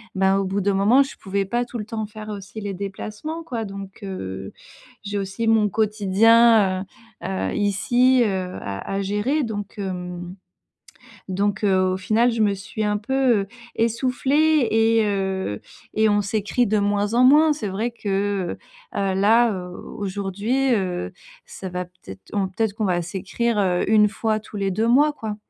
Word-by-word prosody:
bah, 190 Hz, +1 st, +3 dB
au 195 Hz, -, -1 dB
bout 195 Hz, +2 st, -1 dB
d'un 200 Hz, +1 st, +1 dB
moment, 225 Hz, +8 st, +5 dB
je 270 Hz, -, -9 dB
pouvais 195 Hz, 0 st, -2 dB
pas 240 Hz, +5 st, 0 dB
tout 240 Hz, -, -7 dB
le 210 Hz, -, -5 dB
temps 220 Hz, 0 st, -4 dB
faire 215 Hz, 0 st, -9 dB
aussi 205 Hz, +1 st, -7 dB
les 200 Hz, -1 st, -4 dB
déplacements, 210 Hz, -, -6 dB
quoi. 235 Hz, -7 st, -4 dB
Donc 195 Hz, -1 st, -8 dB
heu, 95 Hz, -, -6 dB, 0.5 s
j'ai 205 Hz, 0 st, -3 dB
aussi 195 Hz, +4 st, -3 dB
mon 220 Hz, -2 st, +4 dB
quotidien, 215 Hz, -1 st, +4 dB, 0.4 s
heu -, -, -3 dB
heu, 95 Hz, 0 st, -2 dB
ici, 240 Hz, +5 st, +3 dB
heu, 185 Hz, -3 st, -2 dB
à 100 Hz, 0 st, -5 dB, 0.2 s
à 200 Hz, -, 0 dB
gérer. 210 Hz, +10 st, 0 dB
Donc 205 Hz, -3 st, -5 dB
hem 180 Hz, -2 st, -5 dB, 0.9 s
donc 200 Hz, +2 st, -1 dB
heu, 185 Hz, -1 st, +3 dB
au -, -, -2 dB
final 220 Hz, +5 st, +2 dB
je 225 Hz, -, -1 dB
me 205 Hz, -2 st, +3 dB
suis 215 Hz, +4 st, -5 dB
un 210 Hz, 0 st, +1 dB
peu, 255 Hz, +1 st, +2 dB
heu, 195 Hz, -, -6 dB, 0.3 s
essoufflée 265 Hz, +5 st, +2 dB
et 225 Hz, 0 st, +3 dB
heu 190 Hz, -, -2 dB, 0.4 s
et 220 Hz, 0 st, +4 dB
on 205 Hz, 0 st, +3 dB
s'écrit 215 Hz, +4 st, 0 dB
de 210 Hz, +1 st, +2 dB
moins 205 Hz, +1 st, 0 dB
en 250 Hz, -, +5 dB
moins. 305 Hz, +4 st, +6 dB
C'est 250 Hz, -8 st, -4 dB
vrai 215 Hz, +6 st, -2 dB
que, 200 Hz, -4 st, -2 dB, 0.4 s
heu, 195 Hz, -1 st, 0 dB
là, 225 Hz, +4 st, +4 dB
heu, 180 Hz, -1 st, -6 dB, 0.3 s
aujourd'hui, 205 Hz, +6 st, -1 dB
heu, 180 Hz, -, -2 dB, 0.3 s
ça 190 Hz, -, -8 dB
va 180 Hz, 0 st, -3 dB
peut-être 170 Hz, -, -13 dB
on 200 Hz, -2 st, +1 dB
peut-être 210 Hz, +2 st, -1 dB
qu'on 215 Hz, 0 st, -2 dB
va 180 Hz, -2 st, +1 dB
s'écrire, 200 Hz, +6 st, -2 dB
heu, 180 Hz, -2 st, +1 dB
1 210 Hz, -1 st, +6 dB
fois, 220 Hz, 0 st, -1 dB
tous 215 Hz, 0 st, -10 dB
les 195 Hz, -1 st, 0 dB
2 220 Hz, +5 st, 0 dB
mois, 290 Hz, +5 st, +5 dB
quoi 220 Hz, -6 st, -5 dB
205 Hz, 175 wpm, -23 LUFS, 190-225 Hz, 0.9 s, moins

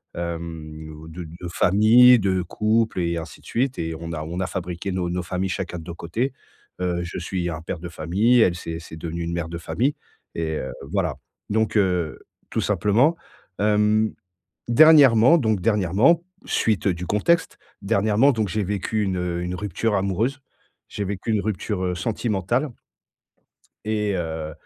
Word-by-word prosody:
hem, 80 Hz, -2 st, -6 dB
de 85 Hz, +2 st, -7 dB
de 85 Hz, +3 st, -9 dB
famille, 110 Hz, +8 st, +6 dB
de 95 Hz, -2 st, +1 dB
couple 110 Hz, +2 st, 0 dB
et 85 Hz, 0 st, -1 dB
ainsi 80 Hz, -2 st, -8 dB
de -, -, -23 dB
suite 130 Hz, +2 st, -1 dB
et 80 Hz, -1 st, -3 dB
on 85 Hz, 0 st, -6 dB
a 80 Hz, -1 st, -4 dB
on 85 Hz, +3 st, -5 dB
a 95 Hz, -, -1 dB
fabriqué 90 Hz, +1 st, -4 dB
nos 90 Hz, -2 st, -1 dB
nos 90 Hz, 0 st, -2 dB
familles 90 Hz, +2 st, -2 dB
chacun 90 Hz, -1 st, -3 dB
de 80 Hz, -, -10 dB
nos 85 Hz, -, -7 dB
côtés. 115 Hz, +12 st, -2 dB, 0.5 s
Heu, 85 Hz, -1 st, -1 dB
je 85 Hz, -, -5 dB
suis 90 Hz, -1 st, -3 dB
un 80 Hz, -1 st, -5 dB
père 85 Hz, +1 st, -5 dB
de 90 Hz, +1 st, -7 dB
famille, 95 Hz, +10 st, +2 dB
elle, 90 Hz, -5 st, +4 dB
c'est 85 Hz, -1 st, -5 dB
c'est 80 Hz, -1 st, -10 dB
devenu 85 Hz, +1 st, -4 dB
une 85 Hz, +1 st, -3 dB
mère 85 Hz, -1 st, -3 dB
de 85 Hz, -, -5 dB
famille 105 Hz, -, -1 dB, 0.4 s
et 80 Hz, -1 st, -2 dB
heu, -, -, -4 dB, 0.2 s
voilà. 90 Hz, -7 st, 0 dB, 0.3 s
Donc, 110 Hz, +1 st, 0 dB
heu, 90 Hz, -5 st, +1 dB, 0.3 s
tout -, -, -1 dB
simplement, 120 Hz, +11 st, +2 dB, 0.4 s
hem, 105 Hz, +1 st, +2 dB, 0.6 s
dernièrement, 140 Hz, 0 st, +7 dB
donc, 110 Hz, -7 st, +1 dB
dernièrement, 105 Hz, -, +3 dB, 0.2 s
suite 110 Hz, -3 st, 0 dB
du 90 Hz, -1 st, -2 dB
contexte, 165 Hz, -, +1 dB, 0.2 s
dernièrement 110 Hz, +5 st, +3 dB
donc 110 Hz, -4 st, 0 dB
j'ai 105 Hz, +3 st, -1 dB
vécu 105 Hz, +2 st, -1 dB
une 95 Hz, -2 st, -1 dB, 0.3 s
une 90 Hz, +1 st, -3 dB
rupture 105 Hz, +2 st, -1 dB
amoureuse, 100 Hz, +8 st, 0 dB, 0.5 s
j'ai 105 Hz, -, -4 dB
vécu 100 Hz, +3 st, -4 dB
une 105 Hz, -, +2 dB
rupture, 100 Hz, -1 st, -2 dB
heu, 90 Hz, -1 st, -1 dB
sentimentale 115 Hz, -, -1 dB, 1.1 s
et 105 Hz, -1 st, 0 dB
heu 80 Hz, -2 st, -4 dB
95 Hz, 165 wpm, -23 LUFS, 85-110 Hz, 1.1 s, dernièrement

